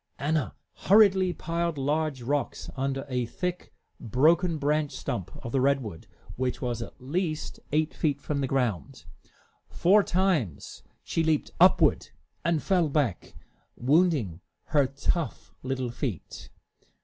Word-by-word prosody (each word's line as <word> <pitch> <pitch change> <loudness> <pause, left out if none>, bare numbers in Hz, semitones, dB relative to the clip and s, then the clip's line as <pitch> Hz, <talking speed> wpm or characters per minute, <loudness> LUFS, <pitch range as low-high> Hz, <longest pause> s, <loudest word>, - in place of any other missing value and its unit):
Anna 150 0 -1 0.3
hurriedly 195 -3 +6
piled 170 -1 -2
large 145 -1 -1
rocks 140 +1 -2
under 135 +1 -2
a 125 -3 -1
thick, 180 +6 -4 0.3
broken 160 - +2
branch 150 0 0
stump 95 - -4 0.2
of 115 - -4
the 135 - +1
redwood, 130 -10 0 0.3
which 125 0 -1
was 120 -2 -3
at 115 - -8
least 155 +4 -3
eight 155 +1 +1
feet 145 -4 0
from 140 0 -2
the 135 - 0
ground. 125 -9 -2 0.6
Four 200 +4 +4
times 175 - -1 0.2
she 165 - -1
leaped 160 -2 +1
upward - - +5 0.3
and 165 -4 +1
fell 180 -5 +2
back, 140 - -1 0.4
wounding 135 - +2 0.3
her 145 -3 +3
tough 140 +2 -3
little 130 -2 -3
feet. 105 - -5
145 Hz, 125 wpm, -27 LUFS, 125-165 Hz, 0.6 s, hurriedly